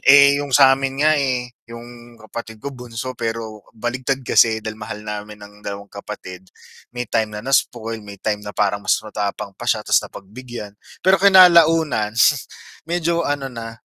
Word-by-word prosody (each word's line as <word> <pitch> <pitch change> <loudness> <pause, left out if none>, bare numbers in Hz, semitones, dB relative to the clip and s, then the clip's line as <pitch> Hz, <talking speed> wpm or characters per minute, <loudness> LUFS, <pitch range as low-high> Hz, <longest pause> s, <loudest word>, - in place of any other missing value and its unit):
Eh 140 +1 +6
yung 145 - -5
sa'min 135 0 +4
nga 155 - +5
eh, 125 -3 -2 0.2
yung 120 0 -12
kapatid 110 0 -9
ko 140 +6 -7
bunso 125 0 -6
pero 115 -2 -5 0.2
baligtad 130 +3 -2
kasi 110 -2 +3
dahil 110 0 -6
mahal 105 0 -7
namin 105 0 -6
ng 105 - -14
dalawang 100 0 -8
kapatid, 95 -2 -9 0.4
may 125 0 -5
time 110 -2 -1
na 105 - -7
na-spoil, 115 -4 0
may 105 -1 -11
time 105 +2 -2
na 105 0 -8
parang 100 0 +1
mas - - +2
matapang 105 -1 -4
pa - - -6
siya - - +1
tas - - +3
napagbigyan, 110 +1 -9 0.3
pero 190 +1 +4
kinalaunan 165 - +5 0.7
medyo 170 0 0
ano 135 -2 -3
na, 115 -1 -8
115 Hz, 160 wpm, -20 LUFS, 105-135 Hz, 0.7 s, Eh